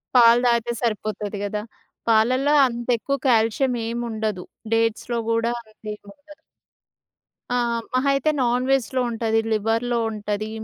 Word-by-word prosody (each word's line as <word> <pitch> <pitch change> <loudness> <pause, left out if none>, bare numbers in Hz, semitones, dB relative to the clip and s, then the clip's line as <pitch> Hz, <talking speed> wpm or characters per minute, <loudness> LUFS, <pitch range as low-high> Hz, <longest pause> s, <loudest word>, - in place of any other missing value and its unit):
పాలు 235 0 +7
దాగితే 235 0 +1
సరిపోతది 215 -2 -2
గదా! 210 +1 -2 0.5
పాలల్లో 255 +6 +3
అంతెక్కువ 240 +3 -1
కాల్షియం 235 +2 +2 0.2
ఏముండదు. 220 -5 -3 0.3
డేట్స్‌లో 230 +1 0
గూడా 230 +1 +1
అంతేముండదు. 215 +7 -12 1.2
ఆ! - - +2 0.4
మహా 260 +2 +2
అయితే 290 +3 +1
నాన్ 245 +1 +1
వెజ్‌లో 260 -1 +1
ఉంటది, 225 -1 0
లివర్‌లో 225 +3 0
ఉంటది 210 0 -3
230 Hz, 105 wpm, -23 LUFS, 215-245 Hz, 1.2 s, పాలు